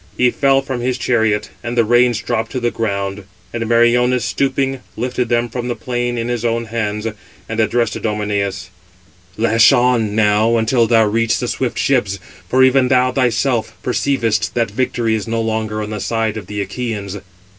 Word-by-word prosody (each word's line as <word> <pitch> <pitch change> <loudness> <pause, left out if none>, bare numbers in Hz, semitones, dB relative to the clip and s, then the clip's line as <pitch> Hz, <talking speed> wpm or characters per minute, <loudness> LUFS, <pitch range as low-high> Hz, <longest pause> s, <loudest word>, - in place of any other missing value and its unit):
He 125 -1 +3
fell 135 -1 +2
from 135 -3 -4
his 125 +1 -1
chariot, 110 -5 0
and 120 0 -4
the 115 - +4
reins 120 0 +3
dropped 110 - -2
to 130 - -1
the 120 -1 0
ground; 100 -2 -3 0.3
and 115 -1 -2
Meriones, 120 +1 +3
stooping, 135 -1 -1 0.2
lifted 125 +1 -2
them 120 0 +1
from 120 +1 -5
the 120 - -2
plain 120 +1 -3
in 115 0 -2
his 120 -2 -2
own 115 0 0
hands, 105 -2 -3 0.4
and 110 0 -4
addressed 115 +1 +1
Idomeneus: 100 -3 -2 0.7
"Lash 115 +1 +5
on, 120 -5 +2
now, 110 +2 +3
until 115 +1 +2
thou 115 -1 +4
reach 115 +2 +1
the 125 - -3
swift 120 -1 -2
ships; 120 -6 +1 0.3
for 130 +5 +4
even 130 0 +4
thou 125 0 +3
thyself 125 -2 0
perceivest 115 -6 0
that 115 -4 0
victory 120 0 0
is 110 -1 -2
no 115 0 -1
longer 110 -1 -2
on 105 - -6
the 105 - -4
side 110 +1 -1
of 105 -4 -7
the 105 -1 -3
Achæans." 105 -2 -5
115 Hz, 175 wpm, -18 LUFS, 110-125 Hz, 0.7 s, Lash